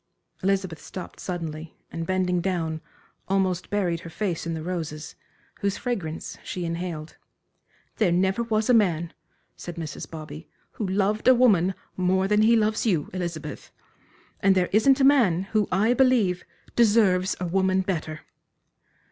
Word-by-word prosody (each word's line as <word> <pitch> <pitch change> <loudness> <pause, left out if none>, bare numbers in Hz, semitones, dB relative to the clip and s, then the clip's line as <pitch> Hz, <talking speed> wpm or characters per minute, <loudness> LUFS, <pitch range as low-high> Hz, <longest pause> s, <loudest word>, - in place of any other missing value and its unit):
Elizabeth 190 -4 -1
stopped 185 - -9
suddenly 165 -3 -5
and 165 0 -4
bending 185 -1 +1
down, 165 -4 -2 0.5
almost 190 -2 0
buried 180 -5 0
her 170 - -9
face 175 -2 -3
in 165 - -2
the 160 - -5
roses, 160 -3 -5 0.5
whose 200 -1 -1
fragrance 185 -11 -4
she 180 -1 -4
inhaled. 165 -2 -5 0.8
"There 205 -6 +3
never 190 +5 +2
was 220 -2 0
a 250 - +4
man," 170 -7 +2 0.4
said 175 - -8
Mrs. 160 -4 -6
Bobby, 155 - -9 0.2
"who 210 - -4
loved 200 +3 0
a 255 - +8
woman 195 -7 +4 0.2
more 190 +1 +1
than 210 +1 +3
he 225 +2 +5
loves 215 -1 +1
you, 175 -10 0
Elizabeth. 170 -5 -5 0.7
And 195 0 +4
there 180 -1 +2
isn't 260 +6 +5
a - - +3
man, 235 - +4
who, 215 -2 +2
I 210 +6 +3
believe, 240 -9 +2 0.3
deserves 205 -5 +3
a 180 - -2
woman 190 +1 +2
better." 160 -4 -3
185 Hz, 150 wpm, -25 LUFS, 170-210 Hz, 0.8 s, a